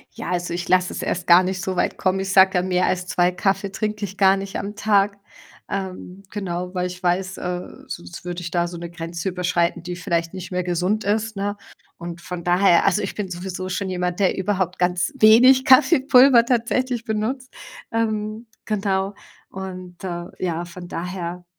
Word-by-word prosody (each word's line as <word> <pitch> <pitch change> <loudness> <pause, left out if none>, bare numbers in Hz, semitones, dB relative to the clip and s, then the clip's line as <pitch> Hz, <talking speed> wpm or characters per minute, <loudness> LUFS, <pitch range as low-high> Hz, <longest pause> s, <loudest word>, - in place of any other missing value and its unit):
Ja, - - -5
also 175 -1 -2
ich 175 0 -4
lass 185 0 +3
es - - -5
erst 180 0 -2
gar 175 0 +7
nicht 185 0 -3
so 185 -1 -3
weit - - 0
kommen. 190 0 +1
Ich 190 0 -2
sage 190 0 +7
dann, 180 0 +1
mehr 180 0 +2
als 180 0 -1
2 180 0 +2
Kaffee 195 +2 -1
trinke 210 +1 -3
ich 195 -1 -5
gar 195 -1 +5
nicht 195 0 -5
am 205 +1 -5
Tag. 200 -1 +2 0.5
Ähm, 190 0 -5
genau, 180 -2 -4
weil 180 0 -1
ich 180 0 -9
weiß, 185 +1 0
äh, 180 0 -3 0.3
sonst 85 - -8
würde 175 0 -4
ich 170 -1 -6
da 175 0 +1
so 175 0 -7
'ne 170 0 -7
Grenze 170 +1 -4
überschreiten, 180 -2 0
die 180 0 -5
vielleicht 170 -2 -2
nicht 185 -1 -7
mehr 180 0 -1
gesund 180 +5 0
ist, 215 +1 -1
ne? 205 +1 -2 0.4
Und 170 0 -7
von 175 0 -7
daher 175 0 +4
also 210 - +3
ich - - -4
bin 205 -3 -4
sowieso 185 +1 -5
schon 190 +1 -2
jemand, 180 0 -2
der 195 -1 +2
überhaupt 190 -2 -1
ganz 180 +9 +1
wenig 255 +3 +7
Kaffeepulver 265 -3 +6
tatsächlich 245 0 0
benutzt. 240 +4 -3 0.4
Ähm, 220 0 -2 0.2
genau. 195 -2 -1 0.4
Und, 185 -2 -8
äh, 175 -2 -4 0.2
ja, 170 -1 -1
von 175 0 -10
daher 180 0 -5
185 Hz, 190 wpm, -22 LUFS, 180-205 Hz, 0.5 s, gar